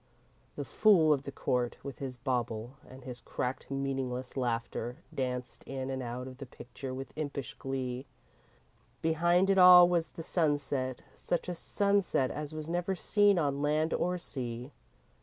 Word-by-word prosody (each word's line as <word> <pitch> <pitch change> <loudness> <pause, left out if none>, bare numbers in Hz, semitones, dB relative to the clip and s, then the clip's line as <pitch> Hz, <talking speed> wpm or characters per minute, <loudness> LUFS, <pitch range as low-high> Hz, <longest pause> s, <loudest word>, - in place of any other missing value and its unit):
The - - -4
fool 170 -8 +5
of 140 -1 -2
the 140 - -4
court, 125 -3 -1
with 140 -2 -7
his 130 -2 -5
bauble 120 -2 -2 0.2
and 130 +1 -12
his 125 -2 -8
cracked, 125 +1 -4
meaningless 135 -2 -3
laughter, 120 -1 -2 0.2
danced 125 -2 -3
in 135 0 -4
and 130 0 -3
out 125 +1 -5
of 130 0 -10
the 135 - -7
picture 130 +2 -8
with 130 0 -6
impish 140 -4 -4
glee. 130 -1 -4 1.0
Behind 170 +3 +3
it 195 - +4
all 180 -1 +10
was 170 -2 +1
the 165 - -9
sunset, 145 -6 0
such 175 - -2
a 180 - -2
sunset 200 -6 +1
as 150 0 -5
was 155 -1 -6
never 175 +3 -1
seen 205 +1 +3
on 140 -3 0
land 155 +2 +1
or 180 +1 0
sea. 125 -5 -5
135 Hz, 160 wpm, -31 LUFS, 125-165 Hz, 1.0 s, all